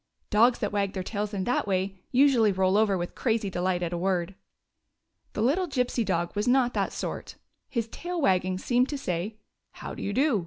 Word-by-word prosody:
" - - -55
Dogs 235 +4 +5
that 210 - -2
wag 200 -1 0
their 185 - -3
tails 205 +1 -3
in 195 -3 -2
that 245 0 0
way 190 0 -1
usually 250 -5 +5
roll 190 0 +2
over 210 -2 +3
with 175 0 -4
crazy 225 -5 0
delight 180 0 0
at 170 0 -2
a - - -1
word. 185 0 0 1.0
The 210 - -1
little 335 +10 +2
Gypsy 250 -4 0
dog 175 -3 -1
was 205 +2 -1
not 245 -1 +3
that - - 0
sort. - - -5 0.3
His 230 -3 -2
tail 350 +9 -5
wagging 185 - +2
seemed 245 +6 +1
to 290 - -2
say: 190 -2 -3 0.2
" - - -54
How - - -7
do - - -8
you 200 - -2
do 260 -1 +2
205 Hz, 210 wpm, -27 LUFS, 185-245 Hz, 1.0 s, Dogs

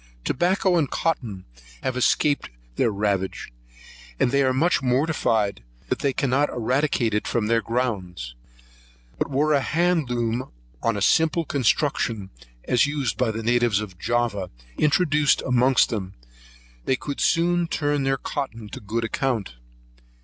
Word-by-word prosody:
Tobacco 180 +3 +2
and 150 -5 +1
cotton 115 - -2 0.4
have 130 - -1
escaped 145 +3 +2 0.3
their 115 - +2
ravage; 100 - -2 0.7
and 120 - +2
they 140 +1 +3
are 130 -1 +3
much 160 +8 +2
mortified 125 - +1 0.3
that - - 0
they 140 - +1
cannot 135 +2 +1
eradicate 125 -1 0
it 105 - -1
from 115 -3 0
their 115 +1 +2
grounds: 95 - -3 0.9
but - - -1
were 145 +3 +2
a 140 - +3
handloom 130 -9 0 0.3
on 115 -2 0
a 100 - -1
simple 160 +4 +3
construction, 125 -6 0 0.3
as 125 +2 +3
used 145 -4 -1
by 125 -3 +1
the 110 +1 -4
natives 120 -2 +2
of 95 -5 -7
Java, 115 -5 -1 0.3
introduced 150 -2 +2
amongst 125 -2 +3
them, 95 -4 -4 0.7
they 130 - +2
could 140 +2 -6
soon 175 +1 +2
turn 145 -2 0
their 135 0 +1
cotton 115 -6 -5
to - - -8
good 110 +3 -3
account. 115 - -1
125 Hz, 140 wpm, -24 LUFS, 110-145 Hz, 0.9 s, they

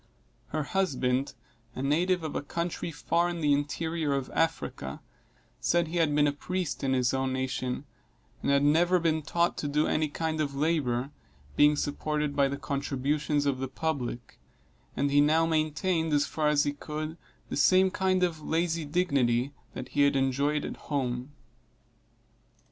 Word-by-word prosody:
Her 155 - -2
husband, 135 -7 0 0.4
a 130 - -4
native 175 +5 +1
of 155 - -4
a - - -1
country 170 +3 -3
far 170 +2 0
in 175 -1 -4
the 145 -2 +3
interior 155 +1 -1
of 135 -1 -2
Africa, 70 - -1 0.6
said 170 -1 +2
he 175 - -3
had 160 -3 +2
been 150 0 +4
a 145 - +3
priest 175 +3 -3
in 135 -1 +1
his 125 -2 +2
own 130 0 0
nation, 130 0 -2 0.6
and - - -1
had 140 0 +4
never 170 +5 +4
been 160 -2 +1
taught 170 +3 0
to 145 - -2
do 150 +2 +1
any 155 0 +1
kind 160 +1 -2
of 140 -2 -2
labor, 140 -4 0 0.4
being 150 0 +5
supported 150 0 -2
by 140 -1 +4
the 140 +1 -3
contributions 145 +2 -1
of 135 -2 0
the 135 - -2
public; 130 -4 -4 0.6
and 140 0 +1
he 145 +1 +5
now 160 +3 +4
maintained, 160 +1 0
as 145 0 +3
far 155 -1 -1
as 150 -1 +4
he 145 - -1
could, 155 +2 -5 0.3
the - - -3
same 185 +7 +4
kind 185 -1 +1
of 165 -3 0
lazy 165 +1 0
dignity, 140 -6 +1 0.2
that - - -6
he 145 - +1
had 140 0 +4
enjoyed 140 +3 +1
at - - -6
home. 130 -3 -3
150 Hz, 165 wpm, -28 LUFS, 140-165 Hz, 0.6 s, being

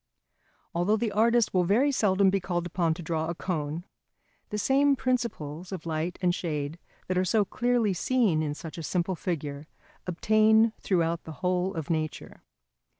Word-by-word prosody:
Although 180 +5 +2
the 225 -1 -1
artist 230 +2 +3
will 180 -1 +3
very 230 +11 +3
seldom 195 -6 +3
be 195 - +1
called 175 -1 -2
upon 170 -2 0
to 175 - -8
draw 160 -1 -1
a 170 - -3
cone, 160 -2 -3 0.7
the 210 - -3
same 275 +5 +3
principles 205 - -2
of 190 - -6
light 165 +2 -2
and 175 -1 +3
shade 155 -2 -3 0.3
that 185 0 +1
are - - +2
so 205 +3 +2
clearly 240 -1 +1
seen 200 -4 +2
in 150 -1 -2
such 160 +2 -8
a - - -4
simple 175 +3 -1
figure 150 -4 -4 0.4
obtain 215 +4 +4
throughout 170 -3 0
the 160 - -7
whole 180 +1 +1
of 160 -1 -3
nature. 155 -1 -3
180 Hz, 165 wpm, -28 LUFS, 165-215 Hz, 0.7 s, obtain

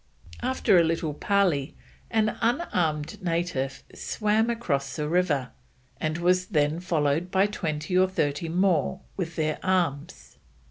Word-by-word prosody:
After 250 -7 +3
a - - +5
little 165 -2 -1
parley 175 -5 +1 0.3
an 215 -1 +1
unarmed 185 - 0
native 165 -6 -2
swam 215 +2 0
across 145 -13 -1
the 150 -2 -2
river, 155 -6 +1 0.5
and 155 +1 -1
was 180 +1 +2
then 150 -3 +1
followed 165 -1 0
by 190 +1 +3
twenty 165 -4 -3
or 185 0 +4
thirty 155 -3 -1
more 175 -3 +1
with 170 -4 -4
their 155 -1 -1
arms. 170 -6 -1
170 Hz, 130 wpm, -26 LUFS, 150-190 Hz, 0.5 s, a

